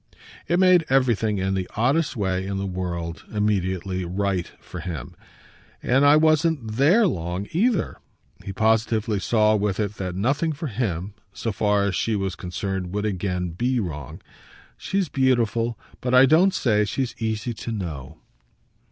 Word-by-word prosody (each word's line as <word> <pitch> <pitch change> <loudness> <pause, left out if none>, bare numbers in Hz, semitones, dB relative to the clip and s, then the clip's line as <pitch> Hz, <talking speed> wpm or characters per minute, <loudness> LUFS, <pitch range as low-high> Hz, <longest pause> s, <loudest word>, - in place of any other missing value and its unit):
It 175 - +2
made 185 -2 +5
everything, 115 -5 +2
in 95 0 -1
the 95 -1 -2
oddest 135 +8 +1
way 95 -2 -1
in 100 0 -3
the 100 - -2
world, 85 -3 -4
immediately 95 -3 -1
right 95 0 -2
for 90 - -9
him. 80 -6 -6 0.7
"And 135 +3 +3
I 145 +1 +7
wasn't 155 -5 +2
THERE 175 - +5
long, 90 - -2
either." 210 +2 +1 0.5
He 100 - -5
positively 110 0 +1
saw 110 +1 +3
with 100 -1 -1
it 105 -1 -2
that 90 -2 -4
nothing 145 - 0
for 155 +3 -6
him, 105 -5 -3 0.2
so 115 - -3
far 105 0 +1
as 100 - 0
she 110 +4 0
was 95 -2 -2
concerned, 90 +1 -4
would 105 +1 -1
again 90 -3 -2
be 120 +9 0
wrong. 75 - -6 0.5
"She's 195 -2 -1
beautiful, 120 -4 +1 0.2
but 125 0 +1
I 130 +1 +8
don't 175 +7 +4
say 105 -8 +2
she's 125 +4 -2
easy 110 +1 -2
to 115 - -6
know." 80 - -5
105 Hz, 155 wpm, -24 LUFS, 95-130 Hz, 0.7 s, I